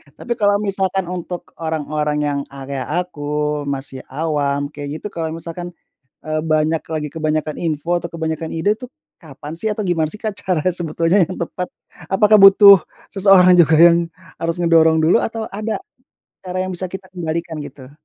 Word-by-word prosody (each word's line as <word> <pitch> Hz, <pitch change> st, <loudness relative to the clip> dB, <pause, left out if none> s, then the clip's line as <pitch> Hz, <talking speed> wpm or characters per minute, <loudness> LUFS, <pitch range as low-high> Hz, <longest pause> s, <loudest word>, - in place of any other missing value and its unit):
Tapi 240 Hz, -, -3 dB
kalau 205 Hz, -1 st, +3 dB
misalkan 195 Hz, -2 st, -1 dB
untuk 180 Hz, 0 st, -6 dB
orang-orang 150 Hz, -2 st, -2 dB
yang, 145 Hz, -1 st, -1 dB
eee, 135 Hz, 0 st, -10 dB
kaya 135 Hz, -2 st, -3 dB
aku, 180 Hz, -4 st, -3 dB, 0.5 s
masih 135 Hz, -1 st, -4 dB
awam, 145 Hz, -1 st, -2 dB
kayak 145 Hz, -1 st, -7 dB
gitu -, -, -4 dB
kalau 160 Hz, -1 st, -4 dB
misalkan, 170 Hz, +1 st, -7 dB, 0.6 s
eee, 155 Hz, 0 st, -1 dB
banyak 155 Hz, 0 st, +1 dB
lagi 155 Hz, -2 st, -3 dB
kebanyakan 155 Hz, -1 st, -2 dB
info 165 Hz, +1 st, -1 dB
atau 170 Hz, -, -6 dB
kebanyakan 160 Hz, -1 st, -3 dB
ide 165 Hz, +6 st, +1 dB
tuh, 250 Hz, -, -8 dB, 0.3 s
kapan 150 Hz, -2 st, -10 dB
sih 220 Hz, -, -2 dB
atau 210 Hz, 0 st, -3 dB
gimana 165 Hz, -3 st, +1 dB
sih 215 Hz, -, -8 dB
Kak 215 Hz, -2 st, -3 dB
cara 180 Hz, -6 st, -1 dB
sebetulnya 170 Hz, +2 st, +1 dB
yang 185 Hz, -, -6 dB
tepat? 180 Hz, +1 st, -4 dB, 0.4 s
Apakah 210 Hz, +2 st, +5 dB
butuh 195 Hz, 0 st, +9 dB, 0.3 s
seseorang 190 Hz, -2 st, +6 dB
juga 160 Hz, -1 st, +5 dB
yang 170 Hz, 0 st, +7 dB, 0.4 s
harus 165 Hz, 0 st, -1 dB
ngedorong 160 Hz, -1 st, +4 dB
dulu, 170 Hz, +8 st, +4 dB
atau 225 Hz, -1 st, -3 dB
ada 215 Hz, +2 st, -3 dB, 0.7 s
cara 185 Hz, +1 st, -2 dB
yang 185 Hz, -, -4 dB
bisa 185 Hz, +1 st, -3 dB
kita 190 Hz, +1 st, -9 dB
kendalikan 170 Hz, -2 st, -4 dB
gitu? 135 Hz, -2 st, -11 dB
165 Hz, 165 wpm, -19 LUFS, 155-185 Hz, 0.7 s, butuh